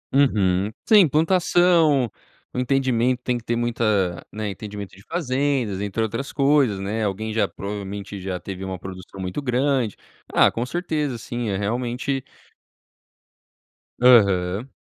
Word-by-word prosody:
Uhum. 100 -8 +3 0.2
Sim, 210 -5 +7
plantação, 165 -2 +3 0.5
o 125 - -2
entendimento 125 -1 +1
tem 125 - 0
que 120 - -5
ter 120 - -1
muita, 110 -7 0
né, 110 0 -4
entendimento 100 0 -8
de 95 - -16
fazendas, 135 - -1
entre 105 +2 -1
outras 115 +5 -3
coisas, 135 -7 +3
né. 105 +3 -2
Alguém 110 +2 -2
já, 110 - +2
provavelmente, 100 0 -6
já 90 -1 -3
teve 95 0 -7
uma 95 -1 -4
produção 95 +1 -10
muito 95 +9 -3
grande. 125 -3 0 0.4
Ah, - - +5
com 115 - -2
certeza, 155 -5 -2
assim, 120 -1 -4
é 95 - -1
realmente 120 +5 -2 1.8
Aham. 100 -2 +4
115 Hz, 135 wpm, -23 LUFS, 100-135 Hz, 1.8 s, Sim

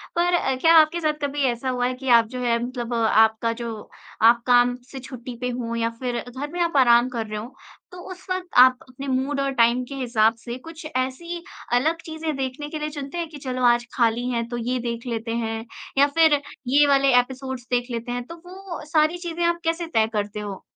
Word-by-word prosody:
पर 350 +1 +2
अ, 265 -6 +1
क्या 330 0 +6
आपके 315 +2 +5
साथ 310 -1 +1
कभी 285 0 -1
ऐसा 240 +2 -4
हुआ 250 -1 0
है 255 - -2
कि 265 +1 -9
आप 230 -2 +6
जो 250 +2 -7
है 235 -1 +2
मतलब 245 -1 -4
आपका 225 0 +3
जो 230 -2 -7 0.3
आप 235 +1 +6
काम 245 0 +5 0.2
से 270 - -7
छुट्टी 250 -1 -8
पे 250 - -1
हों 235 -1 -3
या 230 0 0
फिर 245 -2 -2
घर 265 +4 -5
में 350 - -5
आप 335 -4 +1
आराम 240 -1 +5
कर 230 -3 -3
रहे 210 0 -5
हों, 225 +4 -7 0.4
तो 360 - -11
उस 370 0 -11
वक़्त 370 0 -2
आप 255 0 +7
अपने 270 +2 -8
मूड 270 +2 -1
और 275 0 0
टाइम 235 +1 +3
के - - -4
हिसाब 230 -4 +2
से 240 +1 -5
कुछ 325 +4 -11
ऐसी 335 +7 -3 0.3
अलग 315 +7 +1
चीज़ें 315 -1 -4
देखने 270 +2 -4
के 310 - -5
लिए 300 0 -3
चुनते 285 +1 -7
हैं 340 -1 -2
कि 305 - -10
चलो 255 -1 -3
आज 240 0 +4
खाली 235 +1 +1
हैं 235 -2 -1
तो 240 - -4
ये 245 +2 -2
देख 235 +1 -5
लेते 230 -1 -3
हैं 225 +1 -4 0.3
या 280 +1 +6
फिर 320 -2 +6 0.3
ये 285 +3 +5
वाले 275 -1 +4
एपिसोड्स 260 0 -4
देख 245 0 0
लेते 235 +1 -4
हैं 245 0 -3
तो 335 - -8
वो 370 -1 -8
अ, - - -9
सारी 310 +2 +2
चीज़ें 345 -1 -4
आप 340 0 +1
कैसे 330 +1 -1
तय 220 -8 +2
करते 210 0 -2
हो? 205 -2 -6
255 Hz, 230 wpm, -23 LUFS, 235-305 Hz, 0.4 s, आप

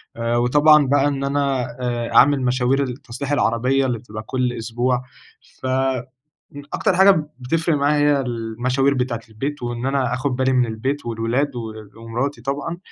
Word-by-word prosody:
آآ 115 0 -1
وطبعًا 145 +4 +5
بقى 140 +1 +3
إن 140 -1 -2
أنا 140 -1 0 0.2
آآ 120 -1 -2
أعمل 140 +1 +6
مشاوير 130 +2 +1
التصليح 125 +1 -6
العربية 130 0 +2
اللي 120 -3 -1
بتبقى 110 -1 -8
كل 125 +1 -1
أسبوع، 120 +2 -1 0.6
ف - - -7
آآ 130 -1 0 0.7
أكتر 185 - +1
حاجة 190 +2 +7 0.3
بتفرق 160 +5 0
معايا 145 0 +3
هي - - 0
المشاوير 125 +3 0
بتاعة 125 -3 -1
البيت 135 +6 -5
وإن 120 0 -3
أنا 135 -3 0
آخُد 130 +1 -1
بالي 130 +1 +1
من 125 -1 +3
البيت 130 +6 -3
والولاد 120 +5 -1
و 115 -2 -5 0.3
ومراتي 120 +3 -3
طبعًا، 140 +6 -3
130 Hz, 160 wpm, -21 LUFS, 120-140 Hz, 0.7 s, حاجة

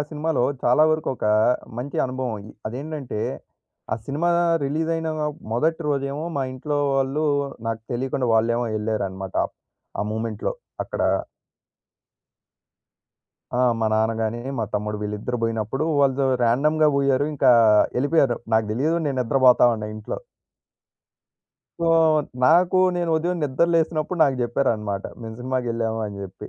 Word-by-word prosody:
సినిమాలో 155 -4 0 0.2
చాలా 125 +5 +4
వరకు 155 0 -2
ఒక - - -2 0.5
మంచి 135 +3 -5
అనుభవం. 125 -5 -4 0.2
అదేంటంటే 135 -2 -5 0.7
ఆ - - +3
సినిమా 155 +5 0 0.3
రిలీజయిన 160 +3 -1 0.4
మొదటి 160 +8 +1
రోజేమో 140 +1 -2
మా 140 - +1
ఇంట్లో 145 +3 -2 0.2
వాళ్ళు 135 +3 0 0.4
నాకు 115 -1 -3
తెలియకుండా 125 0 -1
వాళ్ళేమో 115 +2 +2
ఎళ్లారన్నమాట. 95 -3 -3 0.6
ఆ - - +1
మూమెంట్‌లో 110 -1 -3 0.3
అక్కడ - - -6 2.6
ఆ! - - 0 0.2
మా 110 - +2
నాన్న 110 +1 +2
గాని, 110 +2 -2 0.2
మా 115 - 0
తమ్ముడు 105 +1 -2
వీళ్ళిద్దరూ 105 +4 -3
బోయినప్పుడు 115 +5 -1 0.2
వాళ్ళు 135 0 +2 0.2
ర్యాండమ్‌గా 150 +6 +3
బోయారు. 140 0 +2
ఇంకా 135 -2 +4 0.5
ఎళ్ళిపోయారు. 140 -4 +2 0.2
నాకు 110 -1 +3
తెలియదు 150 +9 +1
నేను 135 -2 -1
నిద్రపోతా 125 0 +5
ఉన్న 110 -1 -5
ఇంట్లో. 110 0 -5 1.6
సో, 170 - +2 0.6
నాకూ 175 +5 +4 0.2
నేను 175 -1 -1
ఉదయం 175 +3 -1
నిద్ర 135 +3 +2
లేసినప్పుడు 165 +1 0
నాకు 135 -2 +1
చెప్పారనమాట. 110 -5 -1 0.2
మేము 110 -1 -7
సినిమాకెళ్ళావా 115 -3 -2
అని 100 -1 -7
జెప్పి. 95 -2 -9
130 Hz, 120 wpm, -23 LUFS, 110-150 Hz, 2.6 s, నిద్రపోతా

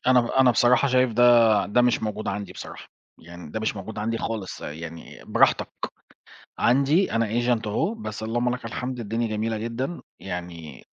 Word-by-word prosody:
أنا 130 -1 +6
ب 120 - -2
أنا 130 0 +4
بصراحة 125 +3 +4
شايف 130 -2 +3
ده 120 +2 +2 0.4
ده 120 +4 +3
مش 120 -2 +2
موجود 105 0 -3
عندي 100 0 -4
بصراحة. - - -10 0.3
يعني 85 -1 -11
ده 110 - -4
مش 110 -1 -1
موجود 105 +3 -7
عندي 115 +2 -1
خالص، 110 -5 -5
آآ، 75 - -5
يعني 80 +1 -10
براحتك. - - +2 0.9
عندي، 140 +9 +3
أنا 115 0 +1
agent 120 0 0
أهو، 150 - 0
بس 215 - -6
اللهم 120 +2 0
لك 125 - -10
الحمد، 125 +2 -4
الدنيا 115 +1 -2
جميلة 110 +1 -2
جدًا، 120 +9 -4 0.2
يعني 85 -6 -7
115 Hz, 175 wpm, -25 LUFS, 105-125 Hz, 0.9 s, أنا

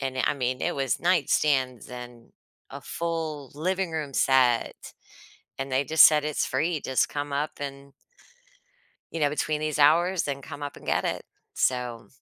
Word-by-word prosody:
and, 135 -1 -3
eh, - - +2
I - - +2
mean 130 -1 -2
it - - -1
was 135 -2 0
nightstands 140 -7 +1
and 120 -1 -10 0.4
a - - -8
full 160 -4 -4
living 185 +4 -1
room 150 -3 -3
set, 125 -3 +2 0.7
and 135 0 -4
they 130 +2 +2
just 160 +3 +7
said 150 -1 +5
"It's 150 -1 0
free, 155 +5 -1
just 130 - +1
come 145 -1 -4
up 145 +2 -1
and" 140 0 -7 1.2
You 165 - -4
know, 145 - +4
between 150 0 -1
these 155 -1 -2
hours 170 +5 +4
and 140 -1 -4
come 145 +1 -9
up 145 - -5
and - - -13
get - - +1
it. - - -2 0.3
So, 125 -2 -1
145 Hz, 170 wpm, -26 LUFS, 130-155 Hz, 1.2 s, just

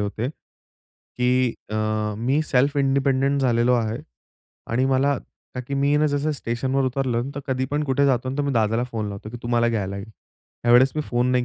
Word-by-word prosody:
होते 105 +4 -2 0.9
की 125 0 +2 0.2
अ, - - -3 0.4
मी 130 +6 +1
self 140 0 +1
independent 135 0 +2
झालेलो 120 -1 +3
आहे 115 -1 -1 0.7
आणि 120 +3 +2
मला 135 +1 +2 0.4
का 125 - -3
की 125 +3 -5
मी 140 +1 +1
आहे 145 - +3
ना, 155 - +3
जसं 145 +1 0
स्टेशनवर 130 +1 -1
उतरलं, 130 -1 -1
तर 140 - -4
कधीपण 135 +3 -1
कुठे 140 0 +2
जातो, 130 -1 +1
तर - - +2
मी 140 -1 -1
दादाला 115 0 +1
फोन 115 -4 -4
लावतो 100 +1 -7
की 120 - -7
तू 120 - -5
मला 120 -1 +2
घ्यायला 100 -4 -2
ये. 100 - -6 0.6
यावेळेस 120 +2 +7
मी 155 - 0
फोन 125 +1 +1
नाही 125 -1 +2
130 Hz, 190 wpm, -23 LUFS, 120-140 Hz, 0.9 s, यावेळेस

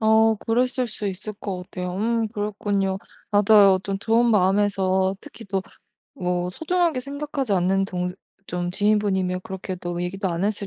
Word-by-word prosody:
어 220 0 +4
그랬을 250 +3 0
수 215 -2 -5
있을 195 +3 -5
것 190 -3 -5
같아요. 180 -1 -5
음 225 +2 0
그랬군요. 205 -2 -1 0.3
나도 205 +1 +3 0.2
어 - - +1
좀 195 0 -3
좋은 230 +3 +3
마음에서 190 -1 +2
특히 230 - -12
또 195 -1 -1 0.6
뭐 180 0 0
소중하게 330 - 0
생각하지 280 -2 -3
않는 190 +2 +2
동 180 -1 -3 0.3
좀 175 0 -3
지인분이면 195 -3 +1
그렇게도 180 -2 -5
얘기도 190 +2 -2
안 170 +1 -2
했을 205 -1 -1
200 Hz, 320 characters per minute, -24 LUFS, 185-220 Hz, 0.6 s, 어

